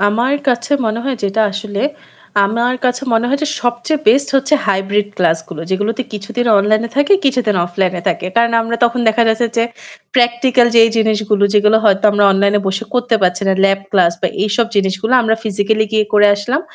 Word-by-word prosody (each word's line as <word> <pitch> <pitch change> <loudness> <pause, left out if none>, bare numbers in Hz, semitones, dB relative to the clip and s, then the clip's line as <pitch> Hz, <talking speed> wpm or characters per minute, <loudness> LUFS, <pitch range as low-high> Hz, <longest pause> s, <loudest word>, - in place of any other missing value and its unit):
আমার 235 +7 +1
কাছে 245 +3 -1
মনে 220 +1 -2
হয় 270 -2 -2
যেটা 200 +3 -1
আসলে 205 0 -5 0.6
আমার 235 +5 -1
কাছে 250 +1 0
মনে 225 +1 +1
হয় 280 +2 0
যে - - 0 0.2
সবচেয়ে 245 +5 -1
বেস্ট 270 +6 +3
হচ্ছে 270 +3 +1
হাইব্রিড 200 +1 0
ক্লাস 165 -2 +1
গুলো 170 -4 -8
যেগুলোতে 205 +6 -1
কিছুদিন 210 +4 -4
অনলাইনে 215 +3 +1
থাকে, 285 +7 +2
কিছুদিন 250 -7 +1
অফলাইনে 180 0 -2
থাকে। - - -3
কারণ 235 0 +2
আমরা 230 +1 -3
তখন 240 +1 0
দেখা 220 +2 +2
যাচ্ছে 225 +2 +1
যে 230 - +2 0.5
প্র্যাকটিক্যাল 240 0 +2
যে - - +7 0.2
জিনিসগুলো 215 -2 +1
যেগুলো 210 +1 +4
হয়তো 200 -1 +2
আমরা 205 0 +2
অনলাইনে 200 +1 +1
বসে 195 +3 -3
করতে 245 -1 0
পারছি 180 +1 0
না। - - +3
ল্যাব 195 0 +2
ক্লাস 180 -4 +3
বা 185 - +1
এইসব 215 +3 0
জিনিসগুলো 195 +4 -1
আমরা 220 -1 +1
ফিজিক্যালি 215 +1 0
গিয়ে 215 -1 +2
করে 210 0 +5
আসলাম। 240 +8 -2
220 Hz, 185 wpm, -15 LUFS, 200-240 Hz, 0.6 s, যে